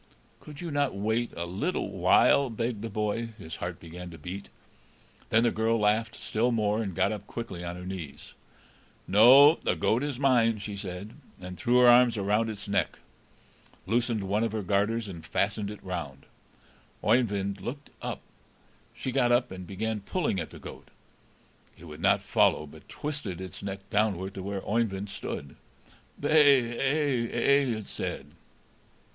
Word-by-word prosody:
"Could 150 0 -11
you 170 -2 -5
not 145 -5 0
wait 110 +4 -1
a 85 - -2
little 100 - -2
while?" 95 +8 +4
begged 115 -1 -3
the 115 - -4
boy; 105 +2 -2
his 80 -6 -8
heart 85 -1 -5
began 85 +2 -9
to 85 - -11
beat. 90 +6 -7 0.8
Then 115 +1 +4
the 120 - +3
girl 115 +1 +1
laughed 110 +2 +1
still 115 +3 0
more, 105 -1 +1
and 95 -5 -4
got 100 - +2
up 105 -1 -6
quickly 115 -7 -6
on 85 0 -5
her 90 0 -8
knees. 90 -7 -8 0.7
"No, 130 - +8
the - - 0
goat 115 +3 +1
is 145 -3 -3
mine," 120 -5 +3
she 105 0 -6
said, 100 +2 -6 0.3
and 90 0 -8
threw 120 +5 +2
her 125 - +7
arms 120 -1 +6
round 105 +3 +1
its 105 -2 -7
neck, 100 - 0 0.9
loosened 115 +1 0
one 100 +3 0
of 115 -2 -1
her 110 -2 -2
garters, 105 +4 0
and 85 -4 -8
fastened 100 +4 -1
it 105 - -9
round. 80 -7 -6 0.8
Oeyvind 100 -4 +1
looked 140 +4 -7
up. - - -4 0.7
She 130 - -4
got 125 -2 +2
up, 120 +1 +2
and 90 -1 -8
began 110 +2 -3
pulling 105 - -1
at - - -4
the - - -12
goat. - - -11 0.9
It 85 - -13
would 75 0 -10
not - - +3
follow, 75 - +2
but 75 +1 -15
twisted 140 - -5
its 95 -1 -8
neck 95 -1 -6
downward 100 -3 0
to 95 - -6
where 100 0 -5
Oeyvind 105 -3 -1
stood. 70 -7 -6 0.6
"Bay 145 0 +6 0.2
ay 135 -2 0
ay," 135 -1 +2
it 110 - -7
said. 70 +2 -5
105 Hz, 165 wpm, -28 LUFS, 95-120 Hz, 0.9 s, No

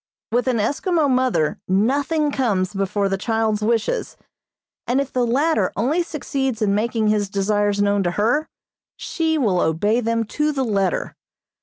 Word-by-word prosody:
With 245 +3 +1
an 250 -2 +1
Eskimo 295 - +1
mother 255 - +1
nothing 285 - +1
comes 210 -8 0
before 195 +1 -1
the 195 0 -2
child's 220 -1 0
wishes, 230 - -1 0.7
and 250 +3 +2
if 280 -1 -3
the 245 -2 +1
latter 265 - +1
only 275 - +1
succeeds 275 -7 -3
in 210 -3 +1
making 220 +1 0
his 210 -2 +1
desires 205 +1 +1
known 205 0 +2
to 175 -2 0
her, 240 +9 +1 0.5
she 320 -2 -1
will 205 -11 +1
obey 205 +9 +1
them 230 -1 0
to 300 +7 -1
the 270 -2 -1
letter. 195 -5 -1
225 Hz, 155 wpm, -21 LUFS, 205-270 Hz, 0.7 s, and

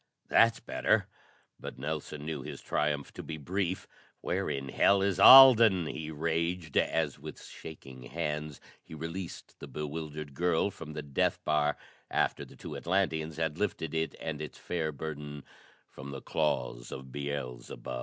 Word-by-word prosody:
"That's 115 0 +5
better." - - +1 0.5
But - - -7
Nelson 75 +1 -4
knew 80 -3 -3
his - - -7
triumph 75 -2 -1
to - - -7
be 80 - -6
brief. 95 +4 -2 0.3
"Where - - -1
in 70 0 -3
hell 100 +8 +4
is 100 -2 0
Alden?" 115 -8 +10
he 75 0 -5
raged 80 +1 -2
as 80 -4 +1
with - - -8
shaking 65 -5 -10
hands 75 -1 -3 0.3
be 80 - -9
released 85 +3 -7
the - - -8
bewildered 75 -1 -5
girl 90 +5 +1
from 85 -5 -9
the 75 - -5
death 70 -2 0
bar 75 -1 +2 0.3
after - - 0
the - - -13
two - - -8
Atlanteans 80 -4 0
had 80 -1 -1
lifted 80 -6 -2
it 80 0 -1
and 80 -2 -4
its 75 - -7
fair 80 -3 -2
burden 75 -1 -6 0.4
from 70 +1 -10
the 70 -1 -6
claws 60 -6 -1
of 65 -1 -8
Beelzebub. 70 -3 -5
80 Hz, 155 wpm, -30 LUFS, 75-85 Hz, 0.5 s, Alden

